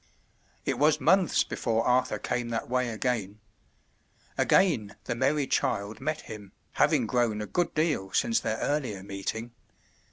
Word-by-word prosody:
It - - -1
was 150 +1 +4
months 180 +6 +3
before 115 -1 -1
Arthur 125 -3 +2
came 120 +3 -2
that 115 -1 -3
way 125 0 0
again. 110 -3 -2 1.0
Again 125 - +2
the - - -2
merry 135 +4 +1
child 100 -4 -1
met 155 0 -2
him, 105 -4 -10 0.2
having - - +2
grown 120 -4 +1
a 105 - -3
good 175 +9 -1
deal 155 - 0
since 235 -1 +2
their 110 - -2
earlier 125 -11 -2
meeting. 100 +4 -5
120 Hz, 140 wpm, -28 LUFS, 105-150 Hz, 1.0 s, was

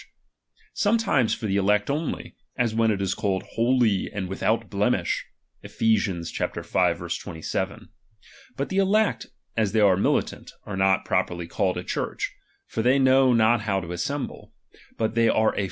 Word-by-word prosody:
^H - - -17 0.7
Sometimes 205 - +2
for - - -7
the 100 -1 0
elect 105 +1 +2
only, 150 +3 -3 0.2
as 120 -4 +1
when 115 0 +2
it 100 -2 0
is 95 - 0
called 95 -2 -1
^H - - -19
hohf 115 -4 +2
and 100 -3 -4
withovt 95 - -1
hlemish - - +1 0.4
{Ephes. 100 -6 0
v, - - -1
27). 80 -1 -4 0.7
But 140 - -2
the 190 - -2
^H - - +5
elect, 210 +3 +1 0.3
as 110 -3 0
they 110 - +3
are 95 -3 +5
militant, 100 - -1
are 105 - -5
not 95 0 +2
properly 85 -1 -1
called 90 +1 -1
^H - - -2
a - - -11
Church; - - -3 0.3
for 115 - -3
they 125 +4 +4
know 130 -1 +5
not 115 0 +4
how 100 -3 0
to 85 -2 -7
assemble; 135 +11 -4 0.2
^H - - -23 0.2
but 110 -1 -1
they 115 0 +3
are 110 0 +2
a. - - -2
110 Hz, 175 wpm, -25 LUFS, 95-125 Hz, 0.7 s, ^H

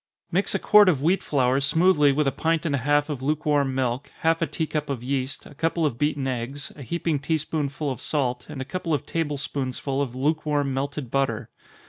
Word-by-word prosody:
_ - - -69 0.3
Mix - - +1
a - - +4
quart 210 -2 +6
of 145 -6 +1
wheat 180 +5 +3
flour 130 -1 +2
smoothly 150 0 +4
with 150 +2 +1
a 135 - +2
pint 165 +2 0
and 155 - 0
a 140 - +1
half 145 +3 +2
of 145 -4 -4
lukewarm 145 -1 +1
milk, 130 +1 -1
half 165 +1 +2
a 165 - +2
tea 160 - -2
cup 150 -1 -3
of 130 -4 -3
yeast, 130 0 -2
a - - -12
couple 165 +3 0
of 125 -5 -1
beaten 145 -2 0
eggs, 130 +3 -4
a 145 - -11
heaping 165 +2 -1
tea 160 +3 0
spoonsful 150 -1 -2
of 130 - -6
salt, 125 -5 -1
and 145 -3 -6
a - - -4
couple 170 0 -1
of 140 - -4
table 155 -3 -2
spoonsful 135 0 -3
of 130 -3 -3
lukewarm 145 0 0
melted 140 -1 -3
butter. 120 -5 -1
145 Hz, 220 wpm, -25 LUFS, 135-155 Hz, 0.3 s, quart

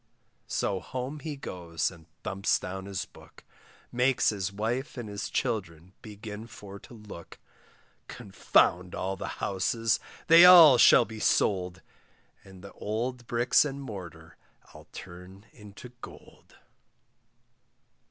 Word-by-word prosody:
So 95 -2 -2
home 130 +8 -6
he 155 -1 -6
goes 85 - -4
and 85 -3 -17 0.2
thumps 95 +1 0
down 95 +1 -7
his 100 -2 -4
book, - - -18 0.5
Makes 125 +1 +2
his 100 -2 -3
wife 115 +8 -4
and 120 -3 -6
his 100 -1 -6
children 90 -4 -4
begin 105 +1 -9
for 100 -3 -11
to 120 - -15
look; 105 -6 -12 0.7
Confound 95 -5 0
all 95 +1 -3
the - - -6 0.2
houses, 115 +4 0 0.3
they 165 +1 +8
all 165 -8 +9
shall 120 - +7
be 110 -1 -10
sold, 90 -5 0 0.6
And 95 -1 -15
the 100 - -11
old 120 +3 -4
bricks 120 +3 +3
and 140 -2 -5
mortar 85 - -10 0.4
I'll - - -15
turn 95 +2 -12
into 105 +2 -13
gold. - - -14
105 Hz, 125 wpm, -28 LUFS, 95-120 Hz, 0.7 s, all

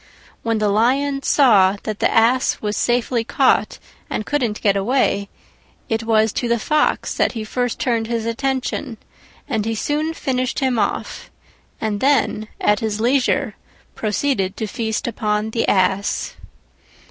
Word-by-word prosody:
When 230 -1 0
the 210 -1 +1
Lion 270 +7 +1
saw 205 -10 +4
that 215 -1 -4
the - - +3
Ass 240 +3 +3
was 210 -1 -2
safely 240 -1 +1
caught - - +2 0.3
and 215 - -3
couldn't 245 -8 -1
get 200 -2 +3
away, 200 -2 +1 0.6
it 225 0 -1
was 220 -1 +2
to 240 - -1
the 235 0 +2
Fox 300 +7 0
that - - +1
he 225 -3 -4
first 245 +2 -2
turned 230 -3 0
his 230 -1 -2
attention, 260 0 -2 0.5
and 225 -6 -1
he 225 +1 -2
soon 305 +7 -1
finished 255 -3 -2
him 260 -4 +1
off, - - -3 0.5
and 215 -2 -2
then 265 -5 +1
at 210 -1 +2
his 215 -1 -2
leisure 250 +3 +1 0.4
proceeded 210 -2 -1
to 220 - -2
feast 220 +1 -3
upon 215 -2 -1
the 230 - -1
Ass. 190 +1 +1
225 Hz, 145 wpm, -20 LUFS, 215-255 Hz, 0.6 s, saw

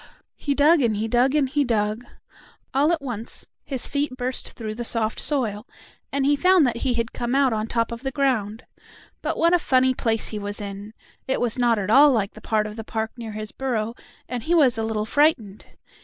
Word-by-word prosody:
He 285 -2 -2
dug 300 +3 +5
and 230 -4 +2
he 220 +2 -1
dug 245 +5 +2
and 290 -3 +3
he 290 +2 +1
dug. 215 -2 -1 0.7
All 285 +5 +3
at 330 -4 -1
once 230 -4 -5 0.2
his 270 -4 -3
feet 285 -2 -2
burst 255 0 -4
through 220 -2 -5
the 240 +2 -5
soft 225 -1 0
soil, 230 -7 0 0.4
and 275 -1 0
he 290 +1 +4
found 365 +1 +4
that 240 -2 0
he 245 0 0
had 230 0 -2
come 240 +1 -2
out 275 -3 +3
on 215 0 -2
top 230 0 -1
of 235 0 -6
the 270 - -2
ground. 250 -6 -1 0.6
But - - -2
what 335 +1 +3
a 355 - +5
funny 260 -3 +3
place 225 -3 -1
he 215 - -4
was 205 0 -5
in! 205 +1 -7 0.3
It 265 - 0
was 245 0 -1
not 240 -2 +3
at 205 0 -2
all 285 +5 +8
like 215 -5 0
the - - -13
part 215 -1 0
of 215 +1 -7
the 225 - -5
park 220 0 -3
near 230 -3 -7
his 215 0 -6
burrow, 230 -4 -2 0.3
and 250 -1 -4
he 335 +9 +1
was 275 -7 +4
a 225 - -2
little 220 -1 -2
frightened. 245 -7 +1
240 Hz, 220 wpm, -23 LUFS, 220-275 Hz, 0.7 s, all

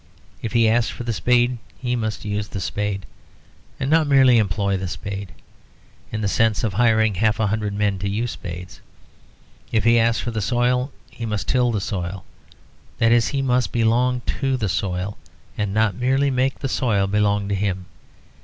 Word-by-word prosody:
If 115 - -4
he 115 -2 +4
asks 115 +1 +2
for - - -6
the 120 -1 -2
spade 125 +2 +2 0.2
he 125 -1 -1
must 110 -3 -3
use 105 0 -2
the 95 - -5
spade, 100 0 -2 0.7
and 130 - -1
not 155 +1 +3
merely 130 -4 +6
employ 100 -1 0
the 95 0 -3
spade, 100 +1 -6 0.8
in 110 - -3
the 105 - 0
sense 110 +2 +1
of 110 -4 0
hiring 110 -1 +3
half 110 +3 +1
a 110 - +2
hundred 105 0 -1
men 100 -2 0
to 100 +1 -2
use 115 +4 -1
spades. 90 0 -8 0.9
If 110 -2 +1
he 115 +1 +5
asks 115 0 +2
for 120 - -3
the 110 -2 -2
soil 125 +5 +1 0.2
he 115 - -6
must 105 -3 -3
till 125 -2 +2
the 110 - 0
soil; 95 -3 -4 0.7
that 115 0 +3
is 120 -1 +4
he 140 -2 -1
must 125 -1 +1
belong 120 +2 +2 0.2
to 135 -1 +1
the 110 -5 -1
soil 95 +1 -2 0.4
and 105 -2 -2
not 110 0 +2
merely 135 +3 +1
make 130 +1 +1
the 140 - -3
soil 110 -6 +1
belong 105 0 +1
to - - 0
him. 95 -2 -1
110 Hz, 185 wpm, -22 LUFS, 100-120 Hz, 0.9 s, merely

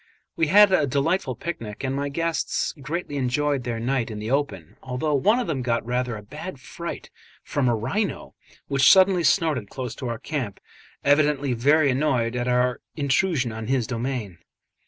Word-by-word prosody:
We 165 - +1
had 205 +4 +7
a 155 -6 +3
delightful 140 +1 0
picnic, 115 -7 -6
and 130 0 -1
my 140 +1 -2
guests 165 +3 -1
greatly 150 +1 -4
enjoyed 140 +1 0
their 115 -2 -2
night 125 0 -1
in 110 - -6
the 105 +3 -4
open, 135 - -2
although 130 +4 -2
one 205 - +3
of 250 - -1
them 155 -7 -2
got 120 -2 -1
rather 125 -1 -1
a 105 - -10
bad 105 - -8
fright - - -7 0.3
from 140 -3 0
a 120 - +2
rhino 185 - -2 0.3
which 140 -1 +5
suddenly 190 -2 +5
snorted 155 - +2
close 125 -3 -5
to 130 - -4
our 115 -1 -3
camp, 130 -6 -4 0.4
evidently 145 -2 +3
very 140 +4 +3
annoyed 125 -4 0
at 125 0 -1
our 125 0 +1
intrusion 140 -2 +1
on 110 0 -6
his 130 -2 +1
domain. 115 -6 -4
135 Hz, 175 wpm, -24 LUFS, 120-150 Hz, 0.4 s, had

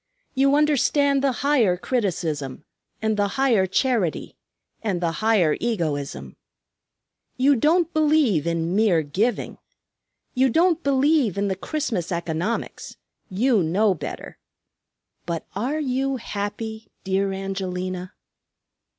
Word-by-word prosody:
You 275 +1 +3
understand 285 -1 +2
the 275 - +3
higher 235 -11 +3
criticism, 165 - -2 0.4
and 220 -1 +1
the 205 0 +2
higher 235 -8 +3
charity, 210 - 0 0.5
and 200 -6 -1
the 170 -1 0
higher 200 -4 +2
egoism. 145 - -3 1.0
You 275 +2 +4
don't 330 +7 +2
believe 295 - +2
in 170 +1 -1
mere 200 -7 +3
giving. 200 +11 -2 0.7
You 260 +1 +3
don't 335 +5 +2
believe 280 - +2
in 200 0 0
the 190 - -1
Christmas 220 - -3
economics, 170 +5 -3 0.3
you 225 +3 +2
know 190 +5 +2
better. 170 - -8 0.9
But 170 -2 -3
are 260 +10 -1
you 270 -1 -1
happy, 220 0 -5 0.2
dear 195 0 0
Angelina?" 185 -1 -4
210 Hz, 110 wpm, -23 LUFS, 180-270 Hz, 1.0 s, You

